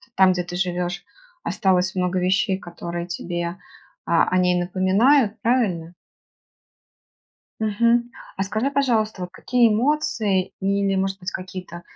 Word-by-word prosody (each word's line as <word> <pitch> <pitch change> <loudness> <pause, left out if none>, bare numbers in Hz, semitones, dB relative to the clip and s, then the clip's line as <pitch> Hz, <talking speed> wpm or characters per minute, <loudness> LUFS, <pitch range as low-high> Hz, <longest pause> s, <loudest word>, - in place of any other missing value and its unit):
там, 190 -1 +6
где 180 0 -2
ты 175 - -6
живешь, 180 0 -2 0.4
осталось 190 -1 +1
много 180 0 0
вещей, 185 +2 +1
которые 175 -1 -6
тебе, 175 +1 -4 0.5
а, 170 - +3
о 185 - +1
ней 180 0 +3
напоминают. 200 +7 +3
Правильно? 190 -9 0 1.7
Мгм. 235 +3 +2 0.3
А 195 - -1
скажи 220 +8 -1
пожалуйста, 225 -8 0
вот 180 - -5
какие 240 +2 +2
эмоции, 220 -6 +1
или 195 0 +1
может 195 0 -1
быть 180 - -4
какие-то 185 -2 -7
190 Hz, 125 wpm, -23 LUFS, 180-220 Hz, 1.7 s, там